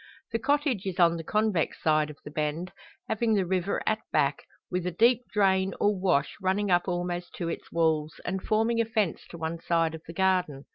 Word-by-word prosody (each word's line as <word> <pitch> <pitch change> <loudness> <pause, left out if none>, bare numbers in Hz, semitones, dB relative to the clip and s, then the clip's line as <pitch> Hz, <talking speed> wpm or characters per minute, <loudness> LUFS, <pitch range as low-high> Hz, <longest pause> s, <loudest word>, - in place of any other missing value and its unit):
The 230 - 0
cottage 280 -6 0
is 190 0 -4
on 170 -1 +5
the 165 - -5
convex 210 -2 0
side 155 -1 +2
of 150 - -10
the 145 - -7
bend, 155 +3 -2 0.4
having 220 0 +1
the 195 -2 +2
river 185 +1 -1
at 220 0 +1
back, 140 -2 +1 0.3
with 180 -1 -1
a - - -1
deep 235 +7 +4
drain, 190 -2 +2
or 205 0 +3
wash, 180 -7 +1
running 190 +1 +1
up 175 +1 +3
almost 175 0 -3
to 170 -2 -3
its - - -6
walls, 160 -2 +1
and 190 +1 -2
forming 225 +3 +2
a - - 0
fence 215 -6 -1
to 170 - -9
one 165 +1 -3
side 165 -1 +1
of 160 - -7
the 165 - -7
garden. 180 -6 +1
180 Hz, 205 wpm, -28 LUFS, 165-205 Hz, 0.4 s, on